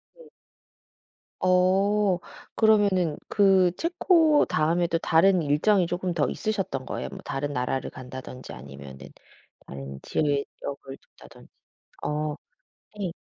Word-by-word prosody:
네. 485 -2 -17 1.1
어 190 +1 +3 0.4
그러면은 200 -7 +3
그 190 -3 +4
체코 335 - +3
다음에도 165 +2 +1
다른 175 +3 +4
일정이 165 +5 +2
쪼금 180 0 -2
더 155 -4 +1
있으셨던 195 -11 -3
거예요? 65 +1 -4
뭐 - - -9
다른 145 +1 -3
나라를 125 0 -2
간다든지 130 0 -9
아니면은 70 +1 -11 0.6
다른 70 0 -8
지역을 140 -2 -3
돈다든지. - - -18 0.5
어 150 0 -2 0.6
네. 190 -4 -3
170 Hz, 240 characters per minute, -26 LUFS, 135-195 Hz, 1.1 s, 그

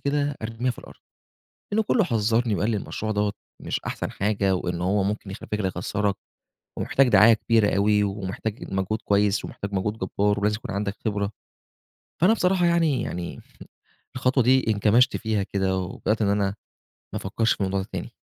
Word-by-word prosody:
كده 145 0 0
أرميها 115 +3 -2
في 120 - -7
الأرض. - - -13 0.7
لإنّه 220 +2 +2
كُلّه 215 +1 +2
حذّرني 115 - +1
وقال 100 +5 0
لي 110 - 0
المشروع 110 +2 -4
دوّة 105 -1 0 0.3
مش - - -2
أحسن - - -4
حاجة 100 -1 +1
وإن 90 -1 -3
هو 95 +2 +1
ممكن 100 0 -3
يخف 100 - -9
يخسّرك 100 0 -1 0.6
ومحتاج 135 -1 +2
دعاية 105 0 +7
كبيرة 110 -2 +2
أوي، 105 +1 +3
ومحتاج 100 +2 -4
مجهود 95 +3 -1
كويس 100 0 +2
ومحتاج 100 0 -6
مجهود 105 +3 -1
جَبّار 100 +1 0
ولازم 105 +1 +1
يكون 110 - -8
عندك 100 0 -2
خبرة. 100 -2 -1 0.9
فأنا 180 +6 +5
بصراحة 180 -4 +2
يعني 165 -5 +2
يعني 85 0 -5 0.8
الخطوة 130 0 +2
دي 130 +2 +4
انكمشْت 110 +5 +3
فيها 110 -2 -1
كده 95 -1 -1
وبدأت 100 +4 -1
إن 100 - +2
أنا 100 0 +2 0.7
ما - - -1
أفكّرش 110 +4 +1
في - - -8
الموضوع 95 0 0
ده 95 - -7
تاني. - - -5
105 Hz, 170 wpm, -25 LUFS, 100-115 Hz, 0.9 s, دعاية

